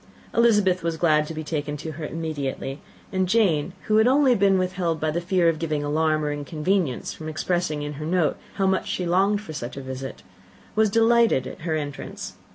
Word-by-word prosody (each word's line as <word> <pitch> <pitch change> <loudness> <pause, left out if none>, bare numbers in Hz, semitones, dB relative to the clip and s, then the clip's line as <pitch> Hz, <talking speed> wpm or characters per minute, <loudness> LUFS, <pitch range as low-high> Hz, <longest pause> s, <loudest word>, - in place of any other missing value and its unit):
Elizabeth 210 -6 +4
was 165 -1 -2
glad 155 -2 +3
to 160 - -5
be 155 - -4
taken 150 -1 -3
to 160 +2 -6
her 155 +1 -6
immediately; 145 -4 -4 0.3
and 185 -2 0
Jane, 180 -7 +2
who 215 - +2
had 220 +2 +5
only 265 0 +5
been 195 -3 +3
withheld 180 -3 -1
by 155 0 0
the 170 +3 -1
fear 180 -1 +2
of 165 -2 +2
giving 155 -3 -1
alarm 155 +1 +1
or 150 - 0
inconvenience, 150 +1 -1
from 155 0 -7
expressing 155 -1 -1
in 145 0 -4
her - - -3
note 170 -3 +1 0.2
how 195 - +1
much 190 0 +1
she 180 - -2
longed 195 +4 +2
for 195 -7 -8
such 125 -3 -6
a - - -4
visit, 130 0 -7 0.5
was 215 0 +4
delighted 230 - +4
at 130 - -8
her 160 -1 -1
entrance. 145 -2 -5
165 Hz, 200 wpm, -24 LUFS, 150-190 Hz, 0.5 s, had